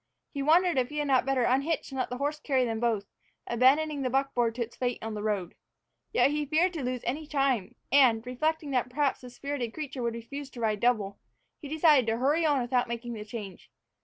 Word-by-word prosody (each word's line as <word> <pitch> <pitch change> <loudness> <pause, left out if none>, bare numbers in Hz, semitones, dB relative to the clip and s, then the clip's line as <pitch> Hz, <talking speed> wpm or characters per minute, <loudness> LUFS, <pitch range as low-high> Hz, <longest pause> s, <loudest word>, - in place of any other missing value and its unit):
He 280 - -3
wondered 335 +1 +4
if 250 0 0
he 300 - -6
had 295 -1 0
not 260 -1 +3
better 270 -2 +2
unhitch 275 +6 0
and 265 - -4
let 255 - -1
the 250 - -4
horse 290 +3 -2
carry 265 -4 +1
them 225 -2 -2
both, 225 -4 0 0.4
abandoning 280 +5 +3
the 255 - 0
buckboard 245 -3 0
to 240 - -1
its 235 - -11
fate 245 -1 -1
on 225 0 -4
the 210 - -4
road. 205 -5 -2 0.6
Yet 365 - +3
he 300 0 0
feared 335 +5 +2
to 315 -5 -4
lose 250 -1 -2
any 290 +6 -3
time, 275 -8 0 0.2
and, 245 -5 +5
reflecting 305 +4 -1
that 250 -2 0
perhaps 285 +1 0
the 250 - -9
spirited 250 -2 -4
creature 285 -4 -5
would 235 -1 -1
refuse 275 +4 -7
to 250 - -11
ride 215 -2 0
double, 215 -5 +1 0.4
he 295 - -7
decided 300 -5 +4
to 225 0 +1
hurry 290 +7 +2
on 290 -2 +3
without 245 0 +1
making 235 0 -5
the 215 -2 -6
change. 210 -3 -8
255 Hz, 220 wpm, -28 LUFS, 235-290 Hz, 0.6 s, and